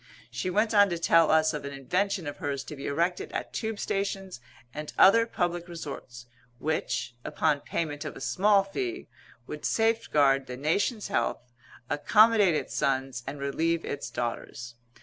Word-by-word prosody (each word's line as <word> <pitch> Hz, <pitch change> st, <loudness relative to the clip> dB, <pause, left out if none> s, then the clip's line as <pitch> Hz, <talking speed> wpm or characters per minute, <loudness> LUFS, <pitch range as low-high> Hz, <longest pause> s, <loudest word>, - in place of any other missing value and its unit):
She 185 Hz, -, -3 dB
went 215 Hz, +4 st, +1 dB
on 205 Hz, -1 st, +6 dB
to 170 Hz, -, -2 dB
tell 165 Hz, -1 st, +4 dB
us 155 Hz, 0 st, +4 dB
of 150 Hz, -, -4 dB
an 140 Hz, 0 st, -6 dB
invention 180 Hz, +7 st, -1 dB
of 145 Hz, -, -5 dB
hers 140 Hz, -1 st, -3 dB
to 150 Hz, -, -8 dB
be 140 Hz, -, -6 dB
erected 170 Hz, +5 st, -1 dB
at -, -, -4 dB
Tube 220 Hz, -1 st, -3 dB
stations 195 Hz, -7 st, -3 dB, 0.3 s
and 150 Hz, 0 st, -6 dB
other 230 Hz, +4 st, +6 dB
public 175 Hz, -4 st, -2 dB
resorts, 140 Hz, -7 st, -8 dB, 0.3 s
which, 140 Hz, -4 st, -2 dB
upon 150 Hz, -3 st, 0 dB
payment 145 Hz, -2 st, -3 dB
of -, -, -6 dB
a -, -, -9 dB
small 200 Hz, +7 st, +3 dB
fee, 355 Hz, -, -4 dB, 0.4 s
would -, -, -8 dB
safeguard 150 Hz, -, +2 dB
the 125 Hz, 0 st, -6 dB
nation's 200 Hz, -, 0 dB
health, 120 Hz, +1 st, -2 dB, 0.4 s
accommodate 210 Hz, -, +4 dB
its -, -, -3 dB
sons, 135 Hz, -3 st, -1 dB
and 140 Hz, +1 st, -5 dB
relieve 160 Hz, +4 st, -1 dB
its 140 Hz, -, -4 dB
daughters. 120 Hz, 0 st, -5 dB
160 Hz, 160 wpm, -28 LUFS, 140-195 Hz, 0.4 s, on